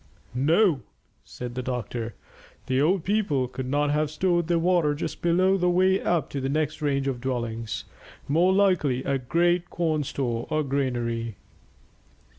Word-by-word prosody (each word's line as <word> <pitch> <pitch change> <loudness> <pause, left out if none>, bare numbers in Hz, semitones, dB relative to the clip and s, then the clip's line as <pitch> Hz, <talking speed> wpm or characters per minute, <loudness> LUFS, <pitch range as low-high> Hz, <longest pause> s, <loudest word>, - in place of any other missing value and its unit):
"No," 155 - +3 0.4
said 125 -1 -7
the 125 - -3
doctor; 120 -3 -4 0.5
"the 130 +1 +1
old 175 +3 +2
people 190 -11 +1
could 130 +1 -6
not 145 +2 +1
have 150 0 +1
stored 175 +1 +1
their 170 -1 +2
water 165 -3 +2
just 145 - -5
below 185 +3 +3
the 180 -1 +2
way 185 +2 +3
up 170 -3 +1
to 140 - -3
the 135 - -1
next 155 +1 -1
range 140 -2 0
of 125 -3 -2
dwellings. 115 -4 -3 0.4
More 170 +6 +3
likely 180 -10 +2
a 140 -1 0
great 175 +7 +1
corn 160 -3 0
store 120 -4 -3
or 155 0 +1
granary." 120 -5 -2
145 Hz, 155 wpm, -26 LUFS, 130-175 Hz, 0.5 s, No